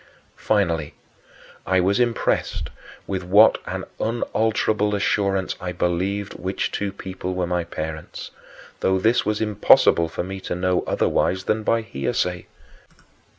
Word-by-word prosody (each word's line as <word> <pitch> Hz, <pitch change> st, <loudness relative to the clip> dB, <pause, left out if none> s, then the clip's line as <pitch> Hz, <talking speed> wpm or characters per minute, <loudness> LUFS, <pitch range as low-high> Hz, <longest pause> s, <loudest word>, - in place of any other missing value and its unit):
Finally, 85 Hz, -8 st, 0 dB, 0.7 s
I 95 Hz, +1 st, +2 dB
was 95 Hz, +4 st, +2 dB
impressed 120 Hz, -2 st, 0 dB, 0.3 s
with 95 Hz, -2 st, -3 dB
what 100 Hz, +5 st, +6 dB
an -, -, -4 dB, 0.2 s
unalterable 110 Hz, -2 st, 0 dB
assurance 100 Hz, -1 st, 0 dB
I 90 Hz, 0 st, -4 dB
believed 95 Hz, +4 st, -1 dB
which 95 Hz, +1 st, -3 dB
two 100 Hz, -1 st, -2 dB
people 95 Hz, -1 st, -6 dB
were 90 Hz, -1 st, 0 dB
my 90 Hz, -1 st, -1 dB
parents, 80 Hz, -1 st, -6 dB, 0.5 s
though 95 Hz, 0 st, +2 dB
this 115 Hz, +4 st, +2 dB
was 105 Hz, 0 st, 0 dB
impossible 100 Hz, -5 st, +4 dB
for 80 Hz, -, -4 dB
me 95 Hz, +1 st, -6 dB
to -, -, -4 dB
know 90 Hz, 0 st, 0 dB
otherwise 95 Hz, +1 st, +1 dB
than 110 Hz, +2 st, 0 dB
by 115 Hz, +1 st, +1 dB
hearsay. 90 Hz, +1 st, -2 dB
95 Hz, 130 wpm, -23 LUFS, 90-105 Hz, 0.7 s, what